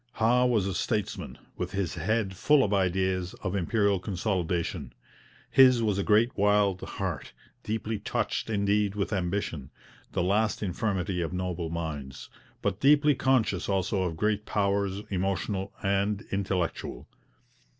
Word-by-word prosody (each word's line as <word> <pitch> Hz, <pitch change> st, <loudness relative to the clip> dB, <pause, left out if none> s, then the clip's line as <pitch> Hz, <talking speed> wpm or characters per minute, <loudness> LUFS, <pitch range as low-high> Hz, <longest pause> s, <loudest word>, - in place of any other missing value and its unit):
Howe 125 Hz, +3 st, +3 dB
was 110 Hz, -6 st, +2 dB
a 95 Hz, -, -2 dB
statesman, 105 Hz, -1 st, -2 dB, 0.2 s
with 90 Hz, +1 st, -4 dB
his 95 Hz, -6 st, -1 dB
head 95 Hz, +3 st, -1 dB
full 145 Hz, +8 st, +4 dB
of 105 Hz, -, 0 dB
ideas 95 Hz, -1 st, 0 dB
of 95 Hz, -1 st, -2 dB
Imperial 100 Hz, +1 st, +1 dB
consolidation. 90 Hz, -3 st, -2 dB, 0.6 s
His 130 Hz, -3 st, +6 dB
was 105 Hz, -3 st, +1 dB
a -, -, +1 dB
great 110 Hz, +4 st, +3 dB
wild 100 Hz, -2 st, +2 dB
heart, 90 Hz, -8 st, -4 dB, 0.3 s
deeply 110 Hz, 0 st, -3 dB
touched -, -, -2 dB
indeed 100 Hz, -1 st, +1 dB
with 105 Hz, +1 st, -2 dB
ambition, 90 Hz, -7 st, -2 dB, 0.4 s
'the -, -, +1 dB
last 105 Hz, +4 st, +1 dB
infirmity 95 Hz, -2 st, -1 dB
of 85 Hz, +1 st, -3 dB
noble 90 Hz, -2 st, -3 dB
minds,' 75 Hz, -5 st, -5 dB, 0.3 s
but 95 Hz, -, -1 dB
deeply 145 Hz, +2 st, +5 dB
conscious 120 Hz, -9 st, +1 dB
also 95 Hz, 0 st, 0 dB
of 85 Hz, -3 st, -2 dB
great 105 Hz, +2 st, 0 dB
powers, 100 Hz, -1 st, 0 dB
emotional 95 Hz, +1 st, -1 dB
and 100 Hz, +2 st, 0 dB
intellectual. 95 Hz, -9 st, -2 dB
100 Hz, 135 wpm, -28 LUFS, 90-105 Hz, 0.6 s, His